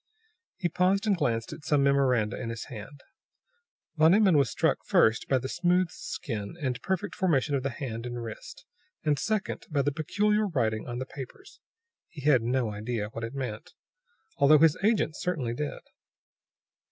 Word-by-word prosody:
He 180 - 0
paused 185 +5 +1
and 205 -2 +3
glanced 115 -8 -1
at 150 - -11
some 145 -2 +2
memoranda 130 -6 +2
in 115 - -4
his 115 -1 -5
hand. 135 +4 -9 1.0
Van 160 +4 +6
Emmon 200 -5 +5
was 140 -4 +4
struck, - - +1
first, 110 +1 +3
by 135 - +4
the 130 - -3
smooth 175 +3 +1
skin 105 -4 -5
and 130 -5 -2
perfect 190 +2 -2
formation 155 -6 +1
of 140 - +1
the 135 - -1
hand 120 -3 -5
and 120 0 -5
wrist; 115 +10 -9 0.4
and, 150 -3 +1
second, 215 +7 -2
by 145 -4 +1
the 145 - +1
peculiar 210 +8 +1
writing 115 - -1
on 120 0 -4
the 130 - -3
papers. 140 - -10 0.5
He 150 - -10
had 140 -4 +5
no 120 -1 0
idea 105 0 -3
what 115 +1 -7
it 115 +4 -5
meant, 125 -6 -5 0.6
although 145 +2 +6
his 155 0 +5
agent 210 -7 +2
certainly 155 -11 -2
did. 145 +4 -4
140 Hz, 170 wpm, -28 LUFS, 120-175 Hz, 1.0 s, Van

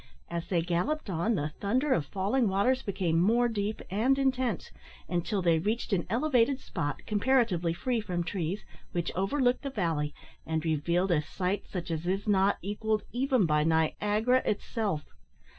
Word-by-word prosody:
As 170 -1 -3
they 170 -3 +1
galloped 190 - -1
on, 185 +7 +1
the 150 -4 -1
thunder 255 +8 +1
of 145 -4 0
falling 205 - +1
waters 245 +7 +2
became 185 -6 0
more 230 +7 +4
deep 215 -2 -2
and 240 +7 +2
intense, 260 -6 0 0.4
until 180 +3 -1
they 165 -2 +4
reached 215 +5 -1
an 175 -3 0
elevated 255 +2 +2
spot, 145 -6 -4
comparatively 210 -6 +2
free 235 +7 -1
from 175 -4 -2
trees, 180 +2 -3 0.3
which 175 -1 -1
overlooked 245 +7 +1
the 280 - -3
valley, 165 - -1 0.3
and 160 0 -2
revealed 170 +4 +1
a 155 -3 +3
sight 185 +5 -3
such 180 -2 -5
as 165 +1 -3
is 195 +3 -1
not 200 -1 +3
equalled 210 +2 -1
even 255 -4 +2
by 150 -1 +2
Niagara 210 +10 +2
itself. 205 - -1
200 Hz, 160 wpm, -29 LUFS, 170-235 Hz, 0.4 s, more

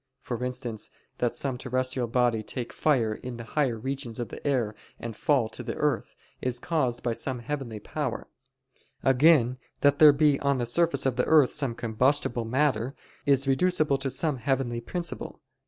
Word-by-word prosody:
For 120 0 -4
instance, 120 -3 -3 0.3
that 120 -1 0
some 130 -3 -3
terrestrial 130 -1 -1
body 120 -1 +2
take 120 +2 -5
fire 120 -8 +2
in 120 +2 -7
the 115 - -7
higher 125 -1 0
regions 130 -1 -4
of 120 -3 -3
the - - -9
air 120 -7 +1 0.3
and 115 -2 -6
fall 130 -1 +2
to - - -6
the - - -4
earth, - - -1 0.3
is 125 -1 0
caused 130 -4 -1
by 120 - 0
some 130 +2 -3
heavenly 120 -3 -5
power: - - -4 0.8
again, 130 -2 +4 0.2
that 145 0 +4
there 155 -1 +10
be 145 -1 +3
on 140 -1 +1
the 120 - -1
surface 140 +2 +1
of 130 -2 +1
the 125 - +2
earth 150 -5 +5
some 135 -6 -3
combustible 120 +1 +1
matter, 130 0 +1 0.3
is 135 -1 +3
reducible 150 0 +2
to 135 0 -2
some 150 +1 -1
heavenly 120 -1 -1
principle. 175 +7 -5
130 Hz, 170 wpm, -27 LUFS, 120-140 Hz, 0.8 s, there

